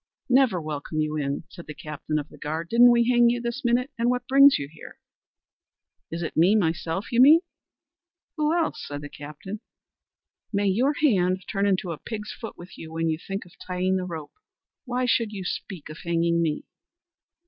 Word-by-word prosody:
"Never 250 Hz, -8 st, +4 dB
welcome 155 Hz, 0 st, -4 dB
you 155 Hz, 0 st, 0 dB
in," 140 Hz, 0 st, -2 dB
cried 170 Hz, -, -11 dB
the 150 Hz, -, -7 dB
captain 150 Hz, 0 st, -4 dB
of 145 Hz, -1 st, -3 dB
the -, -, -15 dB
guard, 160 Hz, +3 st, -4 dB
"didn't 240 Hz, +1 st, +7 dB
we 235 Hz, -1 st, +4 dB
hang 240 Hz, -1 st, +5 dB
you 240 Hz, +1 st, 0 dB
this 240 Hz, +3 st, -4 dB
minute, 250 Hz, +3 st, +1 dB
and 235 Hz, +1 st, +2 dB
what 250 Hz, -1 st, -1 dB
brings 275 Hz, +1 st, +7 dB
you 140 Hz, -, -5 dB
here?" 155 Hz, +2 st, -13 dB, 1.1 s
"Is 170 Hz, +1 st, -4 dB
it 160 Hz, -, -5 dB
me 180 Hz, +6 st, +5 dB
myself, 165 Hz, -1 st, -1 dB
you 240 Hz, +1 st, +4 dB
mean?" 305 Hz, +5 st, +8 dB, 0.9 s
"Who 305 Hz, -1 st, +1 dB
else?" 335 Hz, -1 st, 0 dB
said 145 Hz, 0 st, -6 dB
the 145 Hz, -, -8 dB
captain. 150 Hz, +9 st, -8 dB, 0.9 s
"May 205 Hz, -1 st, 0 dB
your 250 Hz, +10 st, +2 dB
hand 185 Hz, -8 st, +3 dB
turn 200 Hz, -1 st, 0 dB
into 185 Hz, -2 st, 0 dB
a 160 Hz, -, -6 dB
pig's 215 Hz, -2 st, -6 dB
foot 225 Hz, -, -8 dB
with 175 Hz, -2 st, -12 dB
you 160 Hz, -, -9 dB
when 165 Hz, 0 st, -1 dB
you 160 Hz, 0 st, -1 dB
think 195 Hz, +2 st, -5 dB
of 175 Hz, -, -17 dB, 0.2 s
tying 185 Hz, +1 st, 0 dB
the 185 Hz, -, -3 dB
rope; 160 Hz, -4 st, -7 dB, 0.5 s
why 250 Hz, 0 st, -1 dB
should 230 Hz, -3 st, +1 dB
you 195 Hz, -2 st, -5 dB
speak 180 Hz, -2 st, -5 dB
of 155 Hz, +1 st, -10 dB
hanging 170 Hz, 0 st, +1 dB
me?" 155 Hz, -3 st, -1 dB
185 Hz, 190 wpm, -25 LUFS, 160-240 Hz, 1.1 s, mean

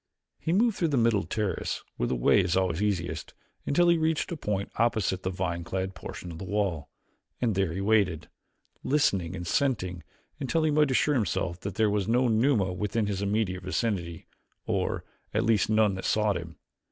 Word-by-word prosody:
He 160 Hz, -, -2 dB
moved 215 Hz, +3 st, +3 dB
through 170 Hz, -, +1 dB
the 145 Hz, -3 st, 0 dB
middle 115 Hz, -3 st, +3 dB
terrace, 105 Hz, -2 st, -2 dB
where -, -, 0 dB
the 65 Hz, -, 0 dB
way -, -, +4 dB
is 90 Hz, 0 st, +1 dB
always 90 Hz, -1 st, 0 dB
easiest, 85 Hz, -6 st, -2 dB, 0.3 s
until 175 Hz, +5 st, +3 dB
he 170 Hz, -1 st, +4 dB
reached 160 Hz, +2 st, 0 dB
a -, -, -1 dB
point 105 Hz, -9 st, -3 dB
opposite 110 Hz, -5 st, +1 dB
the 95 Hz, -, -2 dB
vine 90 Hz, -2 st, -2 dB
clad 95 Hz, +1 st, -3 dB
portion 90 Hz, -1 st, -8 dB
of 80 Hz, -, -8 dB
the -, -, -6 dB
wall, 95 Hz, -6 st, -1 dB, 0.5 s
and 120 Hz, -3 st, +1 dB
there 95 Hz, -3 st, 0 dB
he 95 Hz, +4 st, -3 dB
waited, 95 Hz, -7 st, +2 dB, 0.6 s
listening 100 Hz, -, +1 dB
and 90 Hz, -1 st, -5 dB
scenting, 95 Hz, -7 st, 0 dB, 0.4 s
until 155 Hz, +4 st, 0 dB
he 155 Hz, -, +2 dB
might 150 Hz, -1 st, +3 dB
assure 140 Hz, +3 st, +2 dB
himself 90 Hz, -, -1 dB
that 100 Hz, -1 st, -5 dB
there 110 Hz, -1 st, +2 dB
was 100 Hz, -2 st, 0 dB
no 125 Hz, +3 st, +3 dB
Numa 110 Hz, -4 st, +2 dB
within 105 Hz, +3 st, -1 dB
his 100 Hz, -1 st, -2 dB
immediate 100 Hz, -2 st, 0 dB
vicinity, 95 Hz, -3 st, -2 dB, 0.4 s
or, -, -, -1 dB, 0.3 s
at -, -, +2 dB
least, 110 Hz, -3 st, +2 dB
none 110 Hz, -2 st, +3 dB
that 95 Hz, -, -5 dB
sought 105 Hz, -2 st, +2 dB
him. 80 Hz, -3 st, -6 dB
100 Hz, 190 wpm, -28 LUFS, 90-115 Hz, 0.6 s, way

